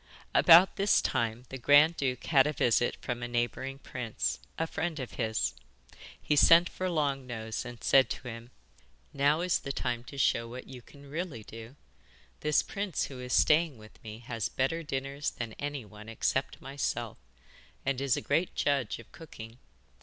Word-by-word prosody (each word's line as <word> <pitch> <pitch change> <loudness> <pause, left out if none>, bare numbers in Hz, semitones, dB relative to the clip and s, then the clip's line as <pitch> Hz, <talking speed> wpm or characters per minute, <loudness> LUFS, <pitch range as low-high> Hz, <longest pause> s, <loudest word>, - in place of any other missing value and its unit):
About 175 +2 +7
this 200 +1 +4
time 115 -2 -1
the 135 - -7
grand 145 +6 +6
duke 130 -4 -2
had 140 -3 +4
a 150 - -1
visit 120 -3 +2
from 120 -1 -3
a 120 - -3
neighbouring 120 +3 -2
prince, 125 -4 -3 0.2
a 165 - 0
friend 160 -1 -3
of 130 - -5
his. 110 -2 -1 0.7
He 150 - 0
sent 165 +4 +7
for 185 0 -3
Long 140 -5 -1
Nose 110 -1 -5
and 120 -1 -9
said 135 -1 +5
to 125 - -6
him: 115 0 -8 0.6
'Now 145 +3 +2
is 180 0 +1
the 140 - -5
time 120 -3 -2
to 140 - -10
show 115 -3 +2
what 125 +2 -8
you 125 -2 -10
can 140 +4 -16
really 155 -6 -5
do. 115 +5 -11 0.6
This 150 -1 +2
prince 200 -3 -3
who 135 -2 -6
is 125 0 -4
staying 155 -3 +4
with 110 0 -16
me 110 -1 -8
has 115 -4 -3
better 135 +6 -1
dinners 140 -1 -3
than 115 -2 -6
any 145 -4 -4
one 105 +1 -12
except 135 +4 -1
myself, 120 -4 -3 0.7
and 135 -1 -1
is 140 -3 +1
a - - -2
great 165 +5 0
judge 140 -5 0
of 115 - -14
cooking. 120 -7 -11
135 Hz, 175 wpm, -30 LUFS, 120-150 Hz, 0.7 s, About